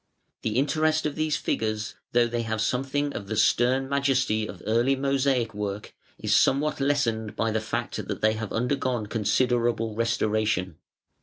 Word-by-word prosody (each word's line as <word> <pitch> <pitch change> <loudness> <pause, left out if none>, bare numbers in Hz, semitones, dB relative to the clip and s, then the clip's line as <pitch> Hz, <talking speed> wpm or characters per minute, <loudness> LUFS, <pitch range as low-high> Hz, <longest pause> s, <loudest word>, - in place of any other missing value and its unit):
The 110 +1 -1
interest 155 +3 +2
of 150 - 0
these 155 0 0
figures, 110 -1 -2 0.2
though 120 0 +4
they 120 0 -2
have 110 -1 -2
something 135 +5 -1
of 100 - -6
the 110 - -3
stern 125 +4 +3
majesty 135 -6 +1
of - - -10
early 120 +5 +2
mosaic 135 -4 +1
work, 105 0 -5 0.2
is - - +1
somewhat 145 +3 +2
lessened 115 -7 0
by 115 0 0
the 110 0 0
fact 110 - -3
that - - -3
they 110 0 +3
have 110 -1 -5
undergone 125 -1 -1
considerable 115 +1 +1
restoration. 110 -6 0
120 Hz, 155 wpm, -26 LUFS, 110-135 Hz, 0.2 s, though